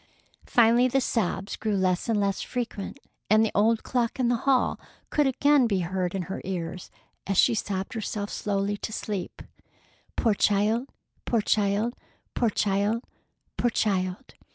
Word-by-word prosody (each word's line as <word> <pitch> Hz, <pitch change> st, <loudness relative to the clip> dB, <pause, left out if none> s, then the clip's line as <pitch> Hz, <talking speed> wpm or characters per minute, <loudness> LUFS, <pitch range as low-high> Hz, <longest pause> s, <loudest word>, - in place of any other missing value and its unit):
Finally 235 Hz, +1 st, +5 dB
the 270 Hz, +2 st, +2 dB
sobs 200 Hz, -5 st, -1 dB
grew 215 Hz, -2 st, -1 dB
less 185 Hz, +2 st, 0 dB
and 220 Hz, -2 st, +2 dB
less 200 Hz, -1 st, 0 dB
frequent, 240 Hz, -1 st, -4 dB, 0.3 s
and 215 Hz, +1 st, +5 dB
the 220 Hz, -, -2 dB
old 220 Hz, +2 st, +3 dB
clock 245 Hz, -1 st, -1 dB
in 245 Hz, -2 st, +2 dB
the 245 Hz, -, +3 dB
hall 260 Hz, -2 st, +2 dB, 0.3 s
could 295 Hz, -2 st, +3 dB
again 275 Hz, 0 st, +4 dB
be 195 Hz, -4 st, 0 dB
heard 180 Hz, +1 st, -2 dB
in 190 Hz, -, -1 dB
her 190 Hz, -, -5 dB
ears, 180 Hz, -1 st, -5 dB, 0.4 s
as 195 Hz, -1 st, 0 dB
she 240 Hz, -, +5 dB
sobbed 195 Hz, -2 st, -3 dB
herself 210 Hz, -2 st, -4 dB
slowly 200 Hz, 0 st, -1 dB
to 220 Hz, -, -5 dB
sleep: 205 Hz, -3 st, -4 dB, 0.7 s
"Poor 225 Hz, -, +3 dB
child! 210 Hz, +6 st, +1 dB, 0.4 s
Poor 230 Hz, -2 st, +1 dB
child! 210 Hz, +3 st, +1 dB, 0.4 s
Poor 235 Hz, -, +2 dB
child! 205 Hz, +3 st, 0 dB, 0.5 s
Poor 240 Hz, -, +2 dB
child!" 195 Hz, +1 st, -1 dB
210 Hz, 155 wpm, -26 LUFS, 195-235 Hz, 0.7 s, Finally